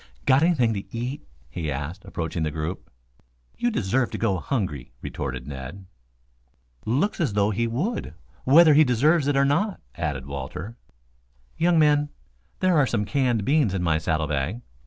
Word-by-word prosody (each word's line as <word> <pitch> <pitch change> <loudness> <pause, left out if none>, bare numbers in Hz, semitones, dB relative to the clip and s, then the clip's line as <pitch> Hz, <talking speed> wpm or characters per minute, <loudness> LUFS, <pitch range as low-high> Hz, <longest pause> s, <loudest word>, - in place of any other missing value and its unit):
"Got 130 +2 +5
anything 145 -9 +3
to 100 +3 -6
eat?" 125 - -5 0.2
he 80 +4 -4
asked, 70 +5 -5
approaching 80 0 -4
the 80 - 0
group. 80 +4 -5 0.7
"You 240 - 0
deserve 120 - 0
to - - -5
go 100 -5 +1
hungry," 80 - -3
retorted - - -4
Ned. 70 +7 -8 1.0
"Looks 150 - 0
as 145 -11 0
though 105 +1 +2
he 115 +3 0
would, 130 - -3 0.3
whether 155 +3 +7
he 155 +2 +7
deserves 145 +4 +3
it 145 -1 +2
or 140 - +4
not," 185 +9 +1
added 70 -4 -3
Walter. 70 - -6 0.8
"Young 170 0 +3
men, 150 -1 +4 0.5
there 185 -2 +3
are 140 - +3
some 105 -4 0
canned 120 -1 0
beans 140 -9 +2
in 90 - -1
my 80 -2 +2
saddle 80 -1 0
bag. 75 - -2
115 Hz, 160 wpm, -25 LUFS, -, 1.0 s, whether